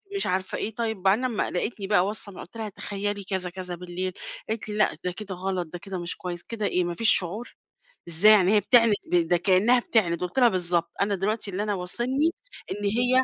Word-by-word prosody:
مش 395 - +1
عارفة 185 +1 -1
إيه، 220 0 -4
طيب 220 -4 -2
بعدين 200 +6 +3
لمّا 240 -4 -1
لقيتني 195 +2 -3
بقى 190 -3 +3
واصل 205 -1 -5
قُلت 230 - -10
لها 220 -1 -4
تخيّلي 205 0 -4
كذا 190 -2 -2
كذا 180 0 -6
بالليل، 180 +1 -4 0.4
قالت 220 -1 -3
لي: 210 - -4
"لأ، 210 - +2
ده 180 - -1
كده 195 +1 -7
غلط، 185 -1 -3
ده 175 +2 -8
كده 190 0 -6
مش 170 - -4
كُويِّس، 175 -2 -5
كده 225 -3 -4
إيه 180 -2 +1
ما 175 0 -3
فيش 225 +3 +5
شُعُور، 200 +7 -6 0.5
إزاي 170 +6 +6
يعني 205 -1 +5
هي - - +7
بتعند 230 0 +5 0.2
ب 175 -2 +3
ده 175 +1 +3
كأنَّها 195 +7 +4
بتعند"، 185 -8 +1
قُلت 180 +8 -2
لها: 245 -2 +7
"بالضبط 175 -3 0
أنا 200 0 +2
دلوقتي 205 +2 -2
اللي 195 +3 -2
أنا 210 -1 -1
واصلني 240 - 0 0.4
إن 205 0 -4
هي 245 +5 +3
195 Hz, 220 wpm, -26 LUFS, 180-220 Hz, 0.5 s, هي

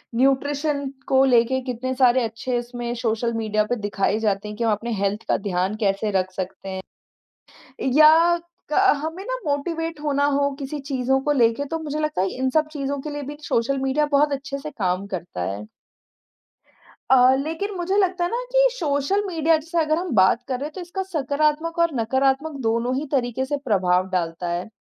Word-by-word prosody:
Nutrition 280 +2 +1 0.2
को 265 0 +4
लेके 250 0 +3
कितने 255 0 -3
सारे 255 -1 +4
अच्छे 230 +2 -2
उसमें 240 0 -5
सोशल 230 0 0
मीडिया 215 -2 0
पे 245 - +1
दिखाए 205 +1 0
जाते 210 -2 -1
हैं 210 0 -7
कि 235 - -2
हम 225 - +2
अपने 230 +3 -2
हेल्थ 200 +2 -1
का - - +3
ध्यान 190 0 -1
कैसे 200 +1 +1
रख 185 0 -3
सकते 185 +1 -6
हैं? 190 0 -4 1.2
या 320 +3 +7 0.4
क - - +2 0.3
हमें 330 +5 -5
ना - - -2
मोटिवेट 325 +3 -2
होना 285 -1 +1
हो 280 0 +2
किसी 285 +1 -5
चीज़ों 265 -1 0
को 295 - +1
लेके, 240 0 +2
तो 325 +3 -3
मुझे 305 -1 -4
लगता 305 -10 0
है 195 - +1
इन 260 0 +1
सब 310 +3 +2
चीज़ों 280 -1 -3
के 300 - -5
लिए 290 0 -5
भी 290 +2 -7
सोशल 270 +4 0
मीडिया 270 +3 +1
बहुत 290 +1 +4
अच्छे 275 0 -4
से 305 +2 -7
काम 190 -6 -1
करता 175 - -5
है। 105 +2 -7 1.4
अ, 260 0 +6
लेकिन 320 +9 -3
मुझे 365 +3 0
लगता 370 -3 +2
है 345 - 0
ना 475 - 0
कि - - +5
सोशल 320 - 0
मीडिया 325 -2 +2
जैसे 330 +3 -5
अगर 310 -1 +2
हम 360 - -4
बात 190 +5 +4
कर 255 -2 -2
रहे 280 - -3
हैं, - - -11
तो 370 - -7
इसका 360 +2 -4
सकारात्मक 310 0 -1
और 335 -2 +3
नकारात्मक 270 +6 +1
दोनों 230 +2 0
ही 285 +3 -2
तरीके 255 -2 0
से 290 +2 -2
प्रभाव 185 -4 +2
डालता 175 -1 -2
है। 175 +4 -3
270 Hz, 195 wpm, -23 LUFS, 225-305 Hz, 1.4 s, या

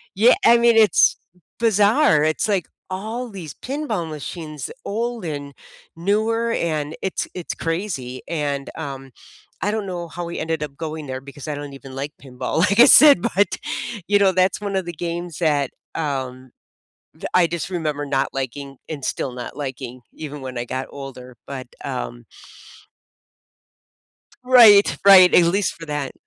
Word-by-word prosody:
Yeah, 225 +6 +6
I 235 +1 +7
mean, 235 -1 +4
it's 215 -2 +5 0.4
bizarre, 210 - +4
it's 155 +8 0
like, 195 -5 0 0.3
all 225 +6 -4
these 180 -8 -8
pinball 245 - -4
machines, 155 -1 -7 0.2
old 230 +1 -3
and 145 -3 -5 0.4
newer, 220 +6 0
and 155 -7 -2
it's 190 - -2
it's 180 -2 -5
crazy, 165 -8 -4
and, 145 -4 -3
um, 135 -4 -7 0.5
I 205 - 0
don't 215 -2 -3
know 175 -2 -5
how 175 +3 -6
we 170 - -5
ended 160 -1 -2
up 140 -2 -7
going 155 -2 -5
there 130 0 -5
because 140 +2 -11
"I 150 - -3
don't 145 0 -7
even 135 -1 -11
like 140 +2 -4
pinball," 130 +1 -5
like 200 +5 +2
I - - +10
said, 285 - +8
but, 195 +1 +1 0.5
you 205 0 +4
know, 195 -1 +4
that's 185 0 +2
one 200 -1 -3
of 190 - 0
the 175 - -4
games 170 0 -5
that, 145 -5 +1 0.2
um, 130 -4 -4 0.6
th - - -7
I 180 -2 +5
just 170 +2 -4
remember 150 -4 -2
not 135 -1 -1
liking, 135 +1 -5
and 150 -4 -6
still 130 - -2
not 125 +2 -8
liking 130 -3 -6
even 150 -2 -8
when 130 -1 -7
I 120 - -2
got 130 +2 -4
older, 130 -3 -10
but 135 -2 -7 0.2
um - - -5 2.2
Right, 230 -6 +7
right, 190 -2 +9
at 175 - +7
least 195 +4 +1
for 165 - -11
that 145 -3 -3
160 Hz, 160 wpm, -21 LUFS, 140-200 Hz, 2.2 s, I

